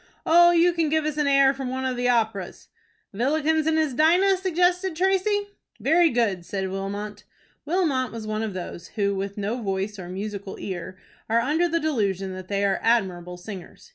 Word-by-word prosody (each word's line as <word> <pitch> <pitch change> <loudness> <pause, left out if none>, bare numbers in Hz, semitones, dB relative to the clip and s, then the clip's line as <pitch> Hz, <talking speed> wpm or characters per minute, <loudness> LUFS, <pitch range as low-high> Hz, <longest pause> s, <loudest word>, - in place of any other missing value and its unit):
"Oh, 345 +1 +7
you 345 0 +4
can 330 -3 0
give 315 0 +1
us 305 -1 -2
an 295 -1 +1
air 275 -1 +5
from 270 -2 -5
one 260 +1 -3
of 260 -1 -1
the 245 0 0
operas." 220 -6 -1 0.4
"Villikens 310 +7 +1
and 320 0 +2
his 310 -4 +1
Dinah?" 355 +8 +4
suggested 360 -1 +1
Tracy. 385 +3 +1 0.4
"Very 340 +1 +4
good," 225 - 0
said 190 +1 -4
Wilmot. 205 +2 -5 0.4
Wilmot 300 -6 0
was 230 -1 -7
one 215 0 -2
of 215 -4 -4
those, 175 -1 -7
who, 200 -1 +1
with 195 +1 -4
no 210 +5 -2
voice 195 0 -3
or 175 -1 -8
musical 200 +1 -6
ear, 185 -1 -6 0.3
are 230 +1 +3
under 310 +8 +1
the 335 +1 +1
delusion 200 - -1
that 185 0 -8
they 200 0 0
are 195 -1 +1
admirable 180 -6 0
singers. 185 - -10
240 Hz, 185 wpm, -24 LUFS, 195-315 Hz, 0.4 s, Oh